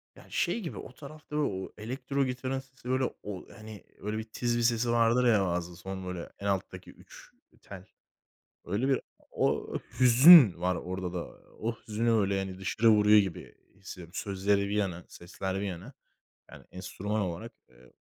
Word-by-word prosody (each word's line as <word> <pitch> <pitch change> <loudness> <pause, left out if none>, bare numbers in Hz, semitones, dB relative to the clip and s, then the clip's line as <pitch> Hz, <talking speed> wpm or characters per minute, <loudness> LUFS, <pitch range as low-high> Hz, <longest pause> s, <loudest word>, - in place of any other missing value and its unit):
Ya - - -15
şey - - 0
gibi, 175 -8 -6
o - - -9
tarafta 150 +2 -11
o 100 -11 -2
elektro 135 +5 -2
gitarın 130 +1 -3
sesi, 130 -2 -12
böyle, 130 +1 +1 0.2
o 100 -3 -7
hani 110 -3 -11 0.2
öyle 105 +1 -4
bir 110 - -3
tiz 120 +2 -2
bir - - 0
sesi 115 0 +2
vardır 120 +1 +3
ya, 110 -4 +4
bazen 90 -1 -2
son 95 +2 -7
böyle 90 -2 -6
en 100 - -7
alttaki 95 -1 -3
3 - - -16 0.3
tel. - - -11 0.8
Öyle 105 +9 -1
bir 135 -2 +2 0.3
o - - -1 0.3
hüzün 125 - +9
var 90 0 0
orada 90 -1 -5
da. 90 -2 -3 0.3
O 115 +2 -2
hüzünü 115 +2 -1
öyle, 100 -3 +2
hani, 95 -1 -5
dışarı 110 +4 +2
vuruyor 105 0 +6
gibi 95 -4 -2 0.2
hissediyorum. 90 -3 -11
Sözleri 100 0 0
bir 100 - -2
yana, 90 -4 -2
sesler 95 +2 -6
bir 100 - -2
yana. 95 +7 -7 0.6
Yani - - -13
enstrüman 100 +3 -4
olarak, 95 +5 -5 0.2
ııı, 60 0 -20
105 Hz, 170 wpm, -29 LUFS, 95-120 Hz, 0.8 s, hüzün